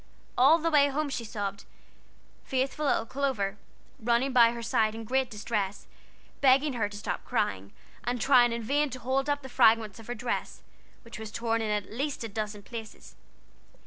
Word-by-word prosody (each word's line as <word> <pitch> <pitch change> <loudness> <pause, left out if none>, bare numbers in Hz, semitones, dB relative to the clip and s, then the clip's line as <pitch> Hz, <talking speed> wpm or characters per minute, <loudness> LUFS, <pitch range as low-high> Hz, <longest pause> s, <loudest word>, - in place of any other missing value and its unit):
All 275 +6 +6
the 330 0 -1
way 285 -2 +5
home 285 +1 -1
she 245 - -3
sobbed; 205 -2 -5 0.8
faithful 270 +3 -1
little 225 - +2
Clover, 225 -6 -2 0.4
running 235 +3 +1
along - - -6 0.2
by - - -2
her 235 0 -6
side 225 -2 +1
in 225 - -6
great 260 +2 0
distress, 210 -2 -3 0.6
begging 275 +1 +4
her 220 -4 -1
to 205 - -9
stop 205 - -4
crying, 95 +1 -2 0.3
and 245 0 -2
trying 245 -1 +5
in 230 0 -3
vain 290 +5 +1
to 255 - -7
hold 265 +3 -1
up 285 -1 0
the - - -7
fragments 225 -4 +3
of 225 - -12
her 245 - -4
dress, 235 +2 -4 0.4
which 230 -2 -10
was 220 -1 -7
torn 230 0 -1
in, 220 - -2
at 210 -1 -2
least, 275 +1 -3
a - - -3
dozen 210 0 -4
places. 225 -1 -9
235 Hz, 185 wpm, -28 LUFS, 215-265 Hz, 0.8 s, All